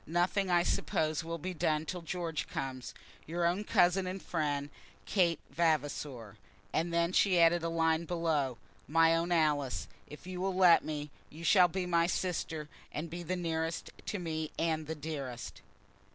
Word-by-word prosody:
Nothing, 175 +4 +1
I 175 -1 +4
suppose, 155 -2 0
will 165 +1 -4
be 180 +4 -4
done 155 -1 0
till 180 +2 -4
George 165 -2 -3
comes. 130 -2 -5 0.3
Your 170 +2 -1
own 180 +5 +1
cousin 185 -1 +3
and 185 +1 -4
friend, 145 -4 -2 0.3
KATE 175 -4 +2
VAVASOR." 145 - -1 0.4
And 170 +2 0
then 170 +1 +1
she 185 -3 +4
added 170 +1 +5
a 165 - -1
line 165 0 +1
below, 160 -7 0 0.3
"My 165 +1 +5
own 170 +1 -1
Alice, 150 -5 +1 0.2
If 150 +4 -11
you 180 -1 -5
will 190 0 -1
let 180 -2 +6
me, 150 -1 -4 0.2
you 160 +3 -11
shall 180 +1 +6
be 185 +2 -3
my 170 -1 +2
sister, 165 -4 -2 0.2
and 160 +2 -5
be 175 +1 -5
the 175 +2 -2
nearest 165 -2 -2 0.2
to 205 - -2
me 160 -3 -3
and 160 -2 0
the 160 - -3
dearest." 145 -5 -6
165 Hz, 165 wpm, -32 LUFS, 155-175 Hz, 0.4 s, let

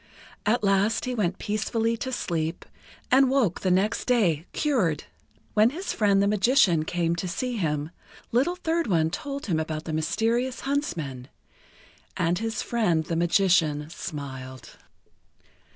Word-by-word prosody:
At 225 +1 +2
last 200 +2 +2
he 250 - -2
went 190 -6 0
peacefully 225 +2 -1
to 260 +3 -4
sleep, 165 -8 -2 0.5
and 265 0 +6
woke 255 -10 +1
the 185 - +1
next 190 +4 +1
day 185 - +2
cured. 210 - 0 0.5
When 215 +2 +5
his 345 +9 -4
friend 200 -2 +3
the - - +2
Magician 200 - +3
came 170 0 0
to 185 - -3
see 245 +7 -3
him, 150 -4 -1 0.4
Little 275 +10 +2
Third 335 -2 -1
One 165 -5 +2
told 280 +8 -5
him 165 -6 0
about 155 0 -3
the 160 - -4
mysterious 230 +11 0
huntsmen, 165 - -3 0.9
and 175 +1 +1
his 225 0 -2
friend 180 -9 +1
the 165 +1 -3
Magician 165 -4 +2
smiled. 130 -5 -7
195 Hz, 140 wpm, -26 LUFS, 160-240 Hz, 0.9 s, and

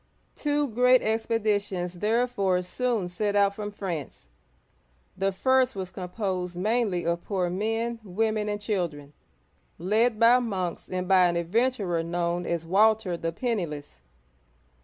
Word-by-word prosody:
Two 295 -1 0
great 250 +2 +4
expeditions 205 -5 -1
therefore 210 -4 +1
soon 225 0 -1
set 205 +3 -2
out 200 -1 +4
from 210 0 -5
France. 170 - -6 0.9
The 195 +1 0
first 260 +5 +2
was 185 -2 -5
composed 180 -1 -4
mainly 210 -2 0
of 170 +1 -1
poor 185 -4 -1
men, 225 +4 -1
women, 215 +2 -1
and 205 0 -2
children, 170 -9 -3 0.6
led 215 +5 +1
by 235 +2 +6
monks 190 -8 -3
and 185 0 -3
by 185 -1 +5
an 170 - -1
adventurer 190 0 0
known 170 +1 -2
as 170 -1 -2
Walter 205 +1 +3
the 165 0 -3
Penniless. 165 - -4
195 Hz, 130 wpm, -26 LUFS, 175-225 Hz, 0.9 s, by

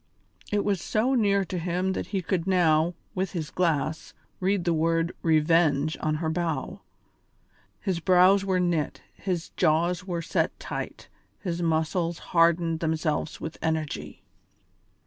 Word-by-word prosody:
It 205 -1 +1
was 195 -4 0
so 230 +5 +1
near 200 -5 +3
to 180 0 -4
him 180 +2 -1
that - - -4
he 195 -3 -2
could 180 0 -1
now, 170 -2 +3 0.2
with 190 -1 -2
his 160 -4 -4
glass, 160 -3 -1 0.2
read 190 -1 0
the 170 - +2
word 165 +1 +1
"Revenge" 155 -2 +3
on 155 0 0
her 160 +1 -2
bow. 160 -5 -2 1.0
His 185 -3 -1
brows 185 +3 +5
were 190 -2 +1
knit, 170 -4 -1
his 180 -4 -3
jaws 170 +2 +1
were 175 -3 -3
set - - -1
tight, - - -6 0.3
his 175 -3 -3
muscles 165 +1 0 0.2
hardened 165 -1 +3
themselves 160 -1 -1
with 160 - -6
energy. 155 - -3
170 Hz, 140 wpm, -26 LUFS, 160-185 Hz, 1.0 s, brows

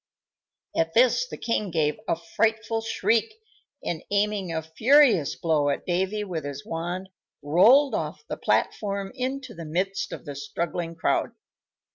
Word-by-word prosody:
At 165 0 0
this 255 - +4
the - - -8
king 215 -3 -1
gave 155 0 0
a - - +2
frightful 220 +6 0
shriek, 225 - 0 0.5
and, 170 -1 -3
aiming 205 -3 0
a 160 -1 -2
furious 225 - +4
blow 155 -3 +1
at 140 - -2
Davy 190 +4 0
with 175 -6 -4
his 145 0 -6
wand, 175 +3 -4 0.3
rolled 225 - +5
off - - -3
the - - -3
platform 200 -2 -1
into 260 -1 -4
the 170 - -8
midst 185 +5 -2
of - - -7
the 145 - -5
struggling 165 +4 -4
crowd. 160 - 0
185 Hz, 145 wpm, -26 LUFS, 165-225 Hz, 0.5 s, rolled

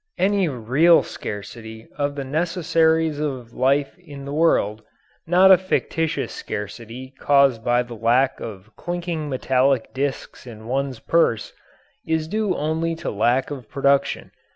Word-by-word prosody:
Any 195 -1 +2
real 135 +7 +4
scarcity 110 +2 -8
of 145 -1 -2
the 140 - -4
necessaries 160 0 +1
of 130 -6 -4
life 140 +2 +1
in 145 -6 -11
the 140 - -5
world 110 -10 +2 0.5
not 185 +3 +6
a 185 - +8
fictitious 165 -3 -1
scarcity 115 +5 -7
caused 140 -5 +3
by 120 +1 +2
the 120 -1 -10
lack 120 +4 +1
of 110 -1 -9
clinking 175 -3 -4
metallic 130 -1 +1
disks 135 -1 -4
in 110 -2 -10
one's 135 +1 -2
purse 115 -4 +1 0.5
is 160 -1 -1
due 210 0 -1
only 160 +2 -1
to 165 - -4
lack 120 +6 +1
of 130 -6 -7
production. 140 0 +1
140 Hz, 135 wpm, -22 LUFS, 120-160 Hz, 0.5 s, a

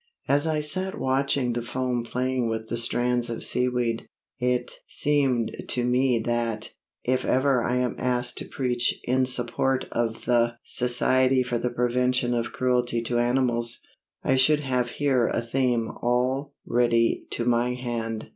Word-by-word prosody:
As 145 +3 +2
I 155 -1 0
sat 185 +7 0
watching 130 -1 +1
the 120 - -2
foam 125 0 -2
playing 125 0 -1
with 110 0 -4
the 115 - -2
strands 120 +1 +1
of 115 - -4
seaweed, 125 -2 0 0.3
it 125 -1 0 0.2
seemed 135 -6 +1 0.2
to 125 -1 -1
me 125 0 +2
that, 115 -2 -2 0.3
if 130 +1 0
ever 130 -2 +2
I 125 - 0
am 125 -1 0
asked 125 -1 0
to - - -6
preach 125 -2 0
in 130 +1 +1
support 125 +1 +2
of 115 -1 -2
the 120 -1 +2
Society 130 +1 +2
for 120 -1 -2
the 125 - -1
Prevention 125 +1 +1
of 115 -1 -2
Cruelty 125 -2 0
to 120 +1 0
Animals, 120 -1 +2 0.4
I 135 - +2
should 150 +3 +4
have 125 -3 -1
here 130 -3 +1
a - - 0
theme 120 -1 0
all 130 +4 0
ready 115 -1 +1
to 115 - -2
my 120 +1 +1
hand. 115 -3 -4
125 Hz, 155 wpm, -25 LUFS, 120-130 Hz, 0.4 s, should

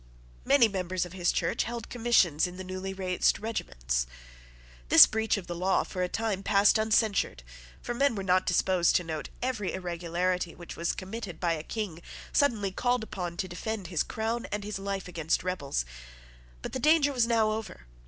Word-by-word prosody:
Many 275 -4 +6
members 185 -3 -2
of 175 - -11
his 180 -2 +1
Church 165 - 0
held 235 -1 -5
commissions 210 -10 +2
in 180 0 -9
the 185 - -6
newly 185 +1 -5
raised 185 -2 +1
regiments. - - -2 0.8
This - - +11
breach 220 0 0
of 195 - -6
the 175 - -5
law 185 +2 +1
for 185 - -5
a 180 - 0
time 220 -3 -2
passed 200 +2 +4
uncensured: 215 - +1 0.4
for - - -3
men 275 0 +2
were 195 - -3
not 185 0 +2
disposed 180 -1 +3
to 180 - +3
note 160 -2 -5
every 230 -7 -1
irregularity 175 0 -2
which 175 - -9
was 170 0 -1
committed 195 -1 -6
by 170 -2 +1
a 155 - -3
King 180 -2 -5 0.3
suddenly 225 -9 +2
called 245 +4 0
upon 175 -5 -5
to 185 - -2
defend 195 +2 -4
his 175 -5 0
crown 225 +2 -2
and 210 0 -2
his 205 -1 -4
life 195 -1 -4
against 165 -2 -1
rebels. 145 - -2 0.8
But - - -5
the 260 - -2
danger 300 0 +4
was 240 -3 +2
now 225 -2 +3
over. 215 - -6
190 Hz, 185 wpm, -29 LUFS, 175-220 Hz, 0.8 s, This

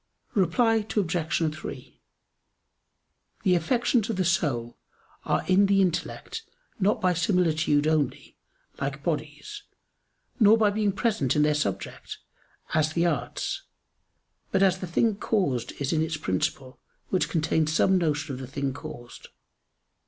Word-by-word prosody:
Reply 225 +5 +3 0.2
Obj. 165 -4 0
3: 155 - -9 1.4
The 185 - +4
affections 225 +6 +1
of 225 - -1
the 185 -1 0
soul 135 -9 0 0.5
are - - 0
in 195 +2 +4
the 195 0 +3
intellect 185 - -1 0.4
not 205 +2 +2
by 185 -1 +2
similitude 165 -4 +2
only, 155 -4 -1 0.4
like 140 +1 -3
bodies; 160 - -4 0.8
nor 215 0 +7
by 215 -2 +3
being 205 -1 +1
present 200 - 0
in 150 - +4
their 150 0 +3
subject, 100 -10 -3 0.6
as 155 0 +2
the 170 +1 +1
arts; 150 -7 -2 0.9
but 190 - +3
as 185 -1 +3
the 185 - -5
thing 205 +5 +1
caused 145 - -1
is 140 +1 -2
in 155 - +2
its 160 0 -1
principle, 130 +3 -2 0.3
which 185 - +1
contains 160 -1 +1
some 190 +4 +3
notion 155 -3 -1
of 130 - -6
the 130 - -6
thing 140 0 -3
caused. 130 -4 -10
165 Hz, 135 wpm, -26 LUFS, 150-195 Hz, 1.4 s, nor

